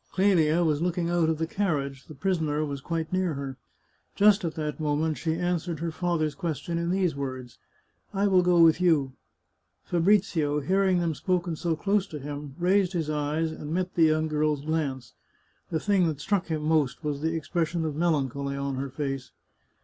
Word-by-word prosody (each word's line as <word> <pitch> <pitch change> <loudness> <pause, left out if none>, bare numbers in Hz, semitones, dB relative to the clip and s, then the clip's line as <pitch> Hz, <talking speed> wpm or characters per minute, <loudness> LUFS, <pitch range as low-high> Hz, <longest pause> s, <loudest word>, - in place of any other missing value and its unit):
Clelia 175 -4 +3
was 155 -2 +1
looking 175 -1 0
out 170 -2 +2
of 160 - 0
the 160 - -1
carriage; 145 -8 -2
the 155 - -10
prisoner 155 -3 0
was 140 -2 -5
quite 165 +2 -3
near 185 -4 0
her. 135 -1 -5 0.6
Just 205 0 +5
at 165 -2 -3
that 150 0 -3
moment 155 +1 0
she 160 -1 -1
answered 175 -2 -2
her 165 0 -2
father's 160 -3 -1
question 170 -1 -3
in 170 0 -1
these 185 -3 +1
words: 130 -3 -6 0.3
" - - -43
I 200 0 0
will 190 -2 +5
go 180 -1 +3
with 165 0 +6
you," 150 -7 +3 0.7
Fabrizio, 170 -5 +2
hearing 190 +4 +2
them 165 -2 0
spoken 170 +3 -1
so 165 +1 -1
close 200 +4 +1
to 155 - -7
him, 145 0 -7
raised 185 +1 +2
his 160 -3 -1
eyes, 150 +2 -1
and 150 -1 -7
met 185 0 -1
the 165 - +4
young 155 0 +2
girl's 150 -1 0
glance. 140 -6 -2 0.6
The 160 - -1
thing 190 0 +2
that 155 -3 -3
struck 195 +3 0
him 155 -2 -2
most 155 -2 +1
was 145 -2 -2
the 160 +1 0
expression 165 +1 -1
of 155 -2 -3
melancholy 140 -4 0
on 140 -1 -2
her 135 +1 -3
face. 135 -2 -4
160 Hz, 190 wpm, -27 LUFS, 145-175 Hz, 0.7 s, with